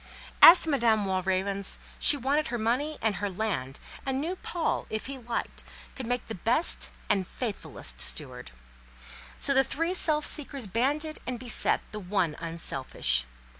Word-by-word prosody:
As 345 +2 +11
to 325 - +1
Madame 230 -6 +2
Walravens, 190 +1 -1 0.2
she 290 - +5
wanted 285 +4 0
her 240 - -3
money 255 +7 -1
and 215 -4 0
her 205 +1 -2
land, 180 -10 -4 0.2
and 265 -1 -2
knew 335 +6 -3
Paul, 345 -2 -3
if 215 - -4
he 275 0 -7
liked, 235 -1 -5 0.3
could 260 -4 -6
make 245 +1 -2
the 225 - -7
best 235 - +2 0.2
and 195 -3 +1
faithfullest 230 -6 -5
steward: - - 0 0.9
so 280 - +2
the 270 0 +5
three 330 +6 -2
self 305 -4 +1
seekers 275 -4 +1
banded 285 - -1
and 250 -2 -3
beset 245 -2 0
the 215 - -6
one 180 -5 -1
unselfish. 135 - -1
235 Hz, 155 wpm, -27 LUFS, 195-280 Hz, 0.9 s, As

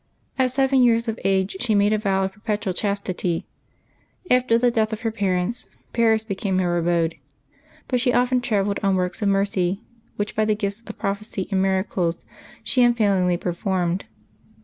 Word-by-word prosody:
At 260 -1 +3
seven 265 +1 +2
years 230 -1 +3
of 225 0 -3
age 190 0 +1
she 230 -4 +1
made 205 +1 +3
a - - +3
vow 195 -2 +1
of 190 0 -2
perpetual 210 -2 -2
chas 200 +2 0
tity. 180 -3 -2 0.9
After 250 -2 +4
the 245 +1 +3
death 220 -1 +1
of 220 - -4
her 225 -2 -1
parents, 200 +1 -1 0.3
Paris 225 -2 +3
became 195 -3 -2
her 175 -2 +1
abode; 170 -1 +1 0.7
but 250 - +1
she 250 0 +2
often 250 +1 +2
travelled 205 -4 0
on 195 -2 +2
works 180 +2 -2
of 205 - +2
mercy, 195 0 0 0.3
which, 205 0 -3
by 215 - +2
the 215 0 +2
gifts 200 +1 -3
of 220 - -8
prophecy 200 -1 -3
and 190 -1 +2
miracles, 190 -3 0 0.4
she 255 - +1
unfailingly 200 -7 +3
per 175 0 -3
formed. 180 0 -1
200 Hz, 175 wpm, -23 LUFS, 190-230 Hz, 0.9 s, After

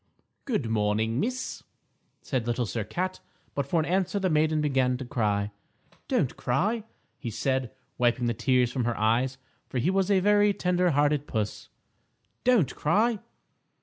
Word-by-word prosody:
"Good 215 - -1
morning, 110 +2 +1
Miss," 255 - -2 0.6
said 125 -5 -2
Little 120 +1 0
Sir 110 +1 -3
Cat, 180 - -3 0.3
but 140 -1 -2
for 165 +4 +2
an 155 - +1
answer 185 +2 0
the 190 -3 +1
maiden 155 0 +2
began 130 -4 +1
to 130 - -6
cry. 105 -5 0 0.6
"Don't - - +1
cry," 205 - 0 0.3
he 120 - -4
said, 130 +2 -1 0.3
wiping 120 0 +2
the 120 - +1
tears 125 +1 +2
from 125 -2 -1
her 120 -1 -1
eyes, 120 +5 +1 0.3
for 130 - -3
he 145 +10 +2
was 195 0 +1
a 195 -2 +4
very 205 +1 +4
tender 180 0 +2
hearted 145 -1 +2
puss. 105 -3 -3 0.7
"Don't 240 - +3
cry." 215 +8 +2
135 Hz, 155 wpm, -27 LUFS, 120-185 Hz, 0.7 s, a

